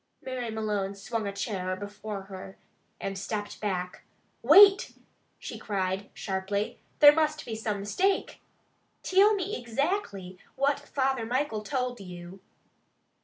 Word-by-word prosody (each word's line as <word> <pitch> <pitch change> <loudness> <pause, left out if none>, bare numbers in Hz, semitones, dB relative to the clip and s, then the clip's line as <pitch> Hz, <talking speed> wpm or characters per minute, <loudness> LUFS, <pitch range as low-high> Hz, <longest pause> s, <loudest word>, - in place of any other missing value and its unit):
Mary 255 -3 -4
Malone 210 -3 -2
swung 215 +2 -3
a - - -2
chair 190 -3 -3
before 205 0 -6
her, 190 0 -10 0.4
and 195 0 -4
stepped 205 0 -4
back. 180 -3 -3 0.4
"Wait!" 390 - +7 0.4
she - - -7
cried 195 -1 -2
sharply. 195 +2 -2 0.2
"There 290 -1 +9
must 305 -1 0
be 225 - -4
some 215 -2 -3
mistake. 380 - 0 0.6
Till 405 +3 +5
me 385 -8 -3
ixactly 230 - -2 0.2
what 280 +1 +1
Father 270 -3 -1
Michael 250 -3 -1
told 250 +1 -2
you?" 180 0 -9
215 Hz, 120 wpm, -28 LUFS, 195-275 Hz, 0.6 s, There